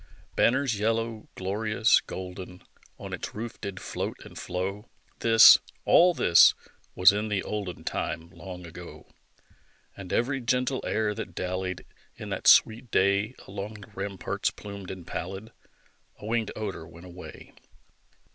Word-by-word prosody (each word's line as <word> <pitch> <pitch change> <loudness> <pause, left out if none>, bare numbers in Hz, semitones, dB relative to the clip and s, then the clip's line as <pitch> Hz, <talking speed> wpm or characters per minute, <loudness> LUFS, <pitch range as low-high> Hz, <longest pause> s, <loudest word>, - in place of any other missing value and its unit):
Banners 125 -3 +2
yellow, 115 0 -1
glorious, 110 +4 +2
golden, 90 0 -8 0.3
On - - -8
its - - -6
roof 115 +2 -6
did 100 -2 -5
float - - -4
and - - -13
flow, 95 +5 -4 0.3
(This 115 -1 +8 0.3
all 175 +1 +6
this 85 - +6 0.4
was 90 +1 +7
in 105 +2 -2
the 100 -3 -1
olden 100 -5 -5
Time 85 0 -4
long 90 -2 -9
ago), 80 - -11 0.9
And 95 -2 -9
every 135 +3 0
gentle 125 +2 0
air 105 -1 0
that 105 -5 -7
dallied, 95 0 -3 0.3
In - - -8
that - - -3
sweet 115 +2 +5
day, 100 +5 +2
Along 100 +2 -6
the 105 -2 -13
ramparts 95 -2 -2
plumed 100 -2 -9
and 95 -3 -8
pallid, 95 +7 -6 0.7
A - - -11
winged 110 -1 -1
odor 100 -6 -5
went 85 +1 -14
away. 90 0 -11
100 Hz, 135 wpm, -27 LUFS, 95-110 Hz, 0.9 s, This